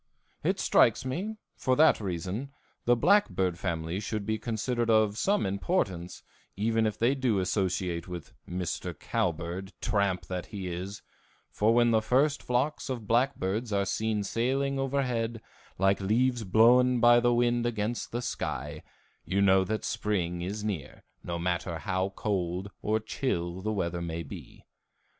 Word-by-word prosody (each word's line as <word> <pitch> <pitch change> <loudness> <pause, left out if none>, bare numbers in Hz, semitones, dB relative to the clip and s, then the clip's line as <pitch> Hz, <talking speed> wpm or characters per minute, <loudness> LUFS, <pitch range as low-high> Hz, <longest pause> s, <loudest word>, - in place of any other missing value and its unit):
It - - +1
strikes - - +4
me, 185 +12 -3 0.2
for 130 -1 +1
that 155 -4 +5
reason, 95 +7 -3 0.4
the 120 - +5
blackbird 120 - +2
family 85 -1 -2
should 105 0 -3
be 110 +1 -1
considered 115 +1 -1
of 110 -2 +4
some 200 - +1
importance, 95 - -2 0.3
even 110 +2 +2
if 105 - -3
they 120 +4 +3
do 130 -6 +1
associate 90 -2 -1
with 90 -4 -8 0.2
Mr. 90 -1 -3
Cowbird, 90 +3 -2
tramp 100 -5 0
that 90 0 -4
he 100 -3 -6
is, 95 +4 -6 0.5
for 110 +2 +2
when 120 -1 +4
the 110 -1 +4
first 140 +6 +2
flocks 130 +4 -1
of 120 -5 -4
blackbirds 115 -2 0
are 100 -1 +1
seen 110 +1 -1
sailing 135 +6 0
overhead, 125 -4 -1 0.4
like 95 +1 +2
leaves 120 +4 +1
blown 120 +5 +5
by 120 +1 +7
the 120 0 +3
wind 120 0 +2
against 115 0 -2
the 120 +1 -3
sky, 125 - -4 0.4
you 95 +3 -1
know 95 -1 +5
that 110 +3 -3
spring 90 -5 -1
is 100 +4 -4
near, 95 -11 -4 0.2
no 85 0 -3
matter 85 -1 -2
how 95 +2 -1
cold 95 -1 -2
or 110 +1 +1
chill 95 -6 -2
the 110 +3 -1
weather 85 -4 -2
may 85 0 -4
be. 70 - -11
105 Hz, 150 wpm, -29 LUFS, 95-120 Hz, 0.5 s, by